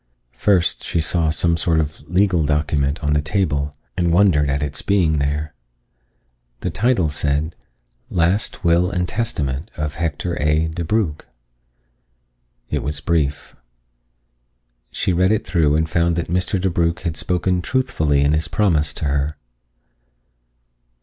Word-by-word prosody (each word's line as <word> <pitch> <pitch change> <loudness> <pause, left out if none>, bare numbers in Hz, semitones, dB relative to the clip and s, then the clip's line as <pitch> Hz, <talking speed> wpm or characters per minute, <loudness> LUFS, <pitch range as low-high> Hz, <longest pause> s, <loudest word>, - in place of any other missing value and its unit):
First 95 -4 +1
she 85 - -1
saw 80 0 +2
some 85 +1 +1
sort 80 -1 +1
of 75 0 -2
legal 90 -1 +2
document 75 0 0
on 75 0 +1
the 75 - +2
table 75 -4 -1 0.2
and 85 -1 +1
wondered 85 -6 +4
at 70 +1 0
its 75 -1 -2
being 85 -7 +2
there. 75 +1 -2 1.1
The - - -2
title 115 -7 +2
said: 75 +2 -1 0.6
_Last 90 +5 0
Will 85 +1 +3
and 90 -2 -1
Testament 85 - -2
of 75 -1 -2
Hector 85 +1 -3
A. 75 +2 +2
DeBrugh+. 85 0 -1 1.5
It - - 0
was 75 +1 -3
brief. 75 -2 -1 1.3
She 95 - -1
read 90 +3 +3
it 110 - 0
through 80 -4 +2
and 80 +1 +1
found 85 +1 +1
that 85 -1 -3
Mr. 90 +2 0
DeBrugh 85 -2 0
had 85 -3 -3
spoken 90 +2 0
truthfully 80 - +1
in 70 +1 +3
his 80 +2 0
promise 85 -7 +1
to - - -5
her. 70 +1 -1
80 Hz, 135 wpm, -20 LUFS, 75-90 Hz, 1.5 s, wondered